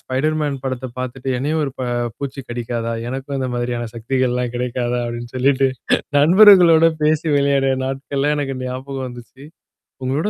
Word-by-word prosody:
Spider 145 Hz, +4 st, -1 dB
man 145 Hz, -3 st, -2 dB
படத்த 130 Hz, -1 st, -3 dB
பார்த்துட்டு, 130 Hz, +1 st, -5 dB
என்னையும் 150 Hz, +5 st, -1 dB
ஒரு 135 Hz, -, -3 dB
ப -, -, -3 dB, 0.4 s
பூச்சி 140 Hz, -1 st, -5 dB
கடிக்காதா? 120 Hz, -1 st, -3 dB, 0.2 s
எனக்கும் 135 Hz, +2 st, -4 dB
இந்த 130 Hz, -1 st, -2 dB
மாதிரியான 120 Hz, -1 st, -2 dB
சக்திகள்லாம் 125 Hz, +1 st, -1 dB
கிடைக்காதா? 125 Hz, 0 st, -2 dB
அப்டின்னு 120 Hz, 0 st, -6 dB
சொல்லிட்டு 135 Hz, +1 st, +3 dB, 0.5 s
நண்பர்களோட 170 Hz, 0 st, +7 dB
பேசி 155 Hz, +1 st, +2 dB
விளையாடு 140 Hz, -1 st, +2 dB
நாட்கள்ல 135 Hz, +2 st, -1 dB
எனக்கு 135 Hz, -2 st, -3 dB
ஞாபகம் 130 Hz, +1 st, -5 dB
வந்துச்சு. 120 Hz, +2 st, -12 dB, 0.6 s
உங்களோட 145 Hz, +10 st, 0 dB
135 Hz, 140 wpm, -19 LUFS, 125-140 Hz, 0.6 s, நண்பர்களோட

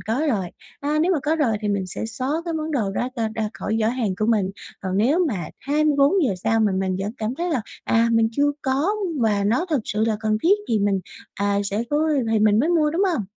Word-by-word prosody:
có 230 Hz, +8 st, -1 dB
rồi. 195 Hz, -8 st, 0 dB, 0.3 s
À, 295 Hz, +2 st, 0 dB
nếu 360 Hz, +4 st, +3 dB
mà 320 Hz, -, +1 dB
có 310 Hz, +2 st, +1 dB
rồi 240 Hz, -9 st, +1 dB
thì 210 Hz, -, -2 dB
mình 200 Hz, -2 st, -1 dB
sẽ 185 Hz, -, -5 dB
xóa 255 Hz, +4 st, -4 dB, 0.2 s
cái 335 Hz, -1 st, -3 dB
món 315 Hz, 0 st, -3 dB
đồ 220 Hz, -9 st, 0 dB
đó 245 Hz, +5 st, -1 dB
ra 225 Hz, -1 st, 0 dB
ra 220 Hz, -1 st, -1 dB
khỏi 220 Hz, -, -2 dB
giỏ 215 Hz, -, +2 dB
hàng 230 Hz, -6 st, -1 dB
của 215 Hz, -, +1 dB
mình, 210 Hz, -5 st, +2 dB, 0.3 s
còn 190 Hz, -1 st, -2 dB
nếu 290 Hz, -, +3 dB
mà 185 Hz, -, -3 dB
24 295 Hz, +4 st, +2 dB
giờ 200 Hz, -, +1 dB
sau 225 Hz, 0 st, +2 dB
mà 210 Hz, -3 st, +2 dB
mình 190 Hz, -1 st, -1 dB
vẫn 205 Hz, +3 st, -3 dB
cảm 220 Hz, +3 st, -2 dB
thấy 345 Hz, +3 st, -2 dB
là, 265 Hz, -7 st, +1 dB, 0.2 s
à, 230 Hz, +1 st, +3 dB
mình 225 Hz, -1 st, +3 dB
chưa 290 Hz, +3 st, +2 dB
có 275 Hz, +8 st, +1 dB, 0.3 s
và 205 Hz, -3 st, +2 dB
nó 245 Hz, -, +1 dB
thực 290 Hz, -6 st, +2 dB
sự 215 Hz, +2 st, 0 dB
là 220 Hz, -2 st, 0 dB
cần 215 Hz, -1 st, +1 dB
thiết 400 Hz, +5 st, +4 dB
thì 220 Hz, -, +2 dB
mình, 200 Hz, -1 st, +1 dB, 0.3 s
à, 200 Hz, 0 st, 0 dB
sẽ 205 Hz, +3 st, -1 dB
cố 305 Hz, +2 st, +2 dB, 0.2 s
thì 220 Hz, -, +3 dB
mình 210 Hz, 0 st, +4 dB
mới 300 Hz, +7 st, +2 dB
mua, 310 Hz, -4 st, +3 dB
đúng 350 Hz, +5 st, 0 dB
hông? 210 Hz, -8 st, -2 dB
225 Hz, 250 wpm, -23 LUFS, 210-295 Hz, 0.3 s, thiết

